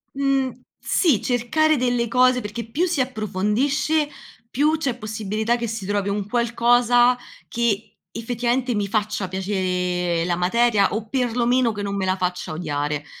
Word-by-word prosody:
Mhmm, 275 Hz, -1 st, +1 dB, 0.3 s
sì, 305 Hz, -, +2 dB
cercare 310 Hz, +6 st, +2 dB
delle 245 Hz, -2 st, 0 dB
cose, 255 Hz, +1 st, +4 dB
perché 220 Hz, 0 st, -5 dB
più 335 Hz, +10 st, +1 dB
si 330 Hz, -6 st, 0 dB
approfondisce, 255 Hz, +7 st, 0 dB, 0.4 s
più 300 Hz, +6 st, +2 dB
c'è 275 Hz, -6 st, -1 dB
possibilità 215 Hz, +1 st, -2 dB
che 240 Hz, -1 st, -3 dB
si 220 Hz, -3 st, -5 dB
trovi 205 Hz, -1 st, -1 dB
un 200 Hz, 0 st, -2 dB
qualcosa 240 Hz, +1 st, +3 dB, 0.3 s
che, 225 Hz, -3 st, -2 dB
effettivamente, 240 Hz, +2 st, -1 dB
mi 205 Hz, -1 st, -1 dB
faccia 210 Hz, -2 st, -1 dB
piacere 180 Hz, -2 st, -1 dB
la 175 Hz, 0 st, 0 dB
materia, 205 Hz, +2 st, +2 dB
o 220 Hz, +1 st, -3 dB
per 250 Hz, -3 st, -1 dB
lo 240 Hz, -1 st, +1 dB
meno 250 Hz, -2 st, +3 dB
che 205 Hz, -1 st, -5 dB
non 200 Hz, 0 st, -3 dB
me 195 Hz, -, -1 dB
la 185 Hz, 0 st, +1 dB
faccia 180 Hz, -2 st, -3 dB
odiare. 150 Hz, -2 st, -3 dB
230 Hz, 155 wpm, -22 LUFS, 200-250 Hz, 0.4 s, cose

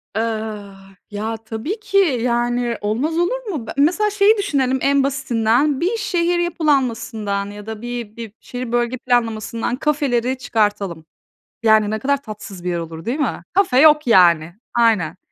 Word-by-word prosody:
Iıı, 215 Hz, -2 st, -3 dB, 0.4 s
ya, 220 Hz, +2 st, -3 dB
tabii 225 Hz, -, -5 dB
ki, 410 Hz, -2 st, -1 dB, 0.2 s
yani, 240 Hz, -1 st, 0 dB
olmaz 255 Hz, +11 st, -1 dB
olur -, -, 0 dB
mu? 285 Hz, -, -4 dB
Be -, -, -4 dB
mesela 355 Hz, +9 st, +3 dB
şeyi 415 Hz, +1 st, +4 dB
düşünelim 270 Hz, -9 st, 0 dB
en 280 Hz, 0 st, +3 dB
basitinden, 265 Hz, +1 st, +1 dB
bir 400 Hz, +7 st, 0 dB
şehir 350 Hz, -4 st, 0 dB
yapılanmasından 250 Hz, -11 st, 0 dB
ya 205 Hz, 0 st, -10 dB
da 220 Hz, 0 st, -7 dB
bir 240 Hz, -3 st, -6 dB
bir 230 Hz, -3 st, -7 dB
şehir 245 Hz, -1 st, -6 dB
bölge 240 Hz, +1 st, 0 dB
planlamasından 230 Hz, -1 st, -1 dB
kafeleri 265 Hz, -3 st, 0 dB
çıkartalım. 205 Hz, -9 st, -1 dB, 0.6 s
Yani, 220 Hz, -2 st, +4 dB
ne 220 Hz, -, -2 dB
kadar 280 Hz, +3 st, +1 dB
tatsız 210 Hz, -5 st, -9 dB
bir 180 Hz, -, -2 dB
yer 175 Hz, -1 st, -1 dB
olur 165 Hz, +1 st, -8 dB
değil 255 Hz, +6 st, -2 dB
mi? 295 Hz, -, -2 dB
Kafe 370 Hz, -10 st, +3 dB
yok, 300 Hz, -1 st, +6 dB
yani, 170 Hz, -6 st, +5 dB, 0.2 s
aynen. 210 Hz, -8 st, +2 dB
240 Hz, 155 wpm, -20 LUFS, 215-290 Hz, 0.6 s, yok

